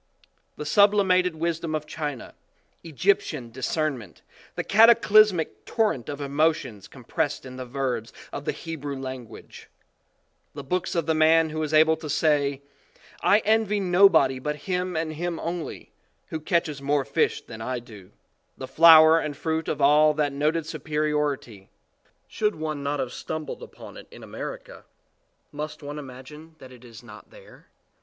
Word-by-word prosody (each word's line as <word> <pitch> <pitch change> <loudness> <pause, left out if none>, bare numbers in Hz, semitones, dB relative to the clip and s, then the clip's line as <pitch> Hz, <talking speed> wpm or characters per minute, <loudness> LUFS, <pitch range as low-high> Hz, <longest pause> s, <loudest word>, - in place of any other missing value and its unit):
The 150 - -7
sublimated 185 -1 +3
wisdom 165 0 -2
of 155 -1 -4
China, 150 -4 -6 0.5
Egyptian 160 -6 -1
discernment, 130 - -3 0.3
the - - -3
cataclysmic 215 -5 +4
torrent 210 - -1
of 145 -1 -5
emotion 145 -5 -1
compressed 140 +3 -4
in 130 0 -9
the 130 -1 -7
verbs 125 -3 -3 0.2
of 145 - -6
the - - 0
Hebrew 145 -4 -6
language, 130 -3 -9 0.9
the - - -7
books 180 +6 -2
of 170 -2 0
the 160 - +1
man 160 0 +4
who 155 0 -3
is 155 -1 -3
able 160 +1 +5
to 155 -1 -8
say, 145 -2 +1 0.6
"I 210 +2 +3
envy 215 -1 +2
nobody 175 -8 +4
but 150 +3 -3
him 180 -2 -2
and 160 -1 -2
him 170 +1 -4
only, 170 0 -6 0.4
who 160 - -4
catches 155 -3 -1
more 140 0 0
fish 140 - 0
than 110 -2 -10
I 125 +2 -3
do," 105 -6 -12 0.5
the 130 - -7
flower 160 +3 +7
and 150 -3 -5
fruit 160 0 -2
of 145 - -3
all 150 +2 +5
that 145 -2 0
noted 155 +4 0
superi 155 0 -3
ority 135 -9 -3 0.6
should 210 -1 -1
one 155 -2 -4
not 140 +1 -2
have 125 - -3
stumbled 155 - -6
upon 480 - -12
it - - -12
in - - -13
America, - - -8 0.7
must 150 +1 -7
one 145 +1 -6
imagine 145 +4 -12
that 130 -4 -14
it 125 -1 -15
is 115 -3 -13
not - - -14
there? - - -17
155 Hz, 155 wpm, -25 LUFS, 140-165 Hz, 0.9 s, flower